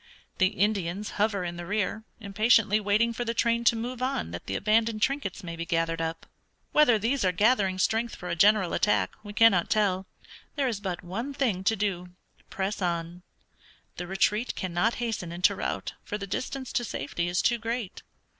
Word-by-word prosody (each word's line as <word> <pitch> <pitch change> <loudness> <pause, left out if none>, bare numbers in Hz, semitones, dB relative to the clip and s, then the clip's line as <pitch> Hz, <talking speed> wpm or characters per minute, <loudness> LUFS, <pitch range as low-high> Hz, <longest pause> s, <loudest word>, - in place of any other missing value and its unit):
The 185 - +5
Indians 200 0 -1
hover 205 -3 +1
in 175 -1 -4
the 175 - -6
rear, 210 +1 -1
impatiently 215 +1 +3
waiting 215 +3 +2
for 245 - -3
the 230 0 -2
train 235 0 +1
to 235 - +5
move 245 +2 -4
on 255 - -1
that 85 - -7
the 95 - -2
abandoned 220 +1 +1
trinkets 260 -8 -1
may 170 -1 -6
be 165 - -4
gathered 165 0 -1
up. 165 0 -4 0.5
Whether 275 -7 +5
these 235 +5 0
are 185 - +3
gathering 200 -1 +2
strength 225 +5 0
for 180 - -8
a - - -1
general 200 0 +4
attack 95 -3 +2
we 205 - -8
cannot 210 -4 +4
tell. 195 -3 +1 0.5
There 280 -3 +1
is 225 -5 -2
but 185 -4 -4
one 230 +11 -5
thing 225 -10 0
to 225 - +3
do 180 -3 -3 0.3
press 195 +1 -3
on. 170 0 -2 0.8
The 180 - -5
retreat 205 +5 0
cannot 185 +5 0
hasten 225 -8 -3
into 175 +1 +3
rout, - - -3
for 210 - -4
the 200 - -5
distance 255 +6 -4
to 240 - +1
safety 170 - -3
is 175 +1 0
too 240 -1 +2
great. 230 -3 -4
205 Hz, 185 wpm, -27 LUFS, 180-230 Hz, 0.8 s, The